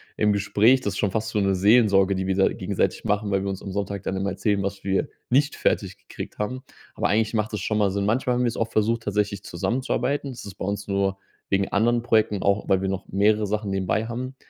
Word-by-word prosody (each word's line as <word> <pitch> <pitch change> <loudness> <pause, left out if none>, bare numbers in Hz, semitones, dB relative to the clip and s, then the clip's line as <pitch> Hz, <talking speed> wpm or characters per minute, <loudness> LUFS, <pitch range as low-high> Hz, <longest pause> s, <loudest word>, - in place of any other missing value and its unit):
im 105 - +2
Gespräch, 105 +6 +3
das 100 -4 -2
ist - - -5
schon 100 -3 +1
fast 110 +1 -2
so 110 - -1
'ne 100 -1 +2
Seelsorge, 100 -1 +4
die 95 0 -2
wir 95 - +1
da 95 - +4
gegenseitig - - -2
machen, 105 0 0
weil 95 0 +1
wir 100 - -2
uns 95 - -5
am 100 - -6
Sonntag 100 0 -3
dann 95 - -2
immer 100 +1 -1
erzählen, 100 -2 0
was 100 0 -4
wir 100 +9 0 0.2
nicht 140 +4 +3
fertig - - 0
gekriegt - - -9
haben, 125 +5 -3 0.3
aber - - 0
eigentlich 110 +1 +1
macht 110 -1 -1
das 105 - -2
schon 110 +2 0
mal 100 -2 +3
Sinn. 100 +1 -1
Manchmal 125 +3 +1
haben 125 - +1
wir's 120 -1 0
auch 115 - -1
versucht, 115 +2 +1
tatsächlich 105 -1 -1
zusammenzuarbeiten. 130 - -1
Das 120 - -9
ist 100 -2 -9
bei - - -5
uns 100 +1 -3
nur 100 -1 0 0.3
wegen 95 0 +1
anderen 120 +3 +2
Projekten, 110 -4 +2
auch 100 +1 +1
weil 95 -1 +3
wir 95 - -1
noch 95 0 -3
mehrere 105 +2 +2
Sachen 105 0 -2
nebenbei 95 +3 0
haben, 130 +3 -5
105 Hz, 240 wpm, -24 LUFS, 100-115 Hz, 0.3 s, Seelsorge